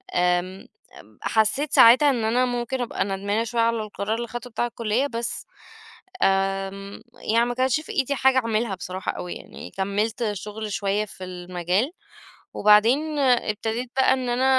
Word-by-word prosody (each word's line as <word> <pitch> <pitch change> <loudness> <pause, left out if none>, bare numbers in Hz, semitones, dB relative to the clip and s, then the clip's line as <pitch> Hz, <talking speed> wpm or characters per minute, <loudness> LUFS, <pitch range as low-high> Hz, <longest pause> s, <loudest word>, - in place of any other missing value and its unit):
آمم 180 +1 0 0.5
حسيت 230 +7 +1
ساعتها 255 +6 +7
إن 240 -4 -1
أنا 240 +3 +2
ممكن 245 +1 -2
أبقى 240 - -1
ندمانة 200 +3 -1
شوية 235 0 -1
على 230 0 +2
القرار 210 0 -3
اللي 235 +1 -4
خدتُه 240 +1 -7
بتاع 235 +1 -1
الكلية، 235 +3 -1
بس 235 -3 -4 0.8
آمم، 195 +1 -1
يعني 230 +2 +1
ما 245 - -2
كانش 260 +3 +2
في - - -9
إيدي 280 +1 0
حاجة 265 0 +3
أعملها 225 -3 -1
بصراحة 185 +1 -4
أوي 180 - -6
يعني - - -10
كمّلت 210 +4 -1
شغل 210 +2 -6
شوية 200 +1 0
في 190 -2 -11
المجال، 180 - -2 0.6
وبعدين 240 +9 +4
ابتديت 235 -2 0
بقى 265 0 +4
إن 260 -1 -1
أنا 245 +2 +1
225 Hz, 150 wpm, -24 LUFS, 200-245 Hz, 0.8 s, ساعتها